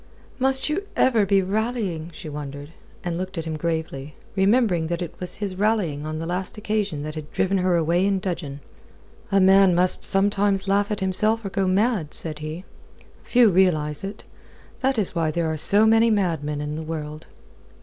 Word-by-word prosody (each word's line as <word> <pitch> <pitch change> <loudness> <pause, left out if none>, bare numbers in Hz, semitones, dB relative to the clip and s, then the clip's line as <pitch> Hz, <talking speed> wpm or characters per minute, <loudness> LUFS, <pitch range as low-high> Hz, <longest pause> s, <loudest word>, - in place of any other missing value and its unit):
"Must 265 0 +2
you 370 +7 -2
ever 225 -6 +3
be 195 -1 +3
rallying?" 200 -5 -2
she 160 +1 -10
wondered, 145 0 -7 0.3
and 175 -1 -3
looked 185 0 -5
at 165 - -3
him 160 -1 -3
gravely, 155 -3 -4 0.2
remembering 195 -4 +2
that 170 0 -2
it 170 - -7
was 180 -1 -6
his 200 -2 -4
rallying 185 -8 0
on 155 0 -4
the 165 - -4
last 180 +4 -4
occasion 210 -8 -2
had 155 -1 -7
driven 190 0 0
her 180 -1 +2
away 170 +3 +2
in 200 -1 +1
dudgeon. 165 -7 -5 0.7
"A 195 - +4
man 190 -1 +5
must 180 +1 +2
sometimes 195 0 +2
laugh 200 +1 +2
at 210 -2 -3
himself 215 +4 +1
or - - -2
go 195 0 -1
mad," 190 -4 0
said 155 -2 -6
he. 155 +4 -6 0.6
"Few 240 -4 +4
realize 155 -5 +2
it. 195 +2 -7 0.6
That 265 -1 0
is 205 -4 0
why 165 -2 0
there 170 +2 -1
are 160 0 -1
so 200 +8 +4
many 225 +1 +4
madmen 160 -8 -1
in 150 0 -4
the 155 - -4
world." 155 -1 -6
185 Hz, 180 wpm, -23 LUFS, 160-205 Hz, 0.7 s, man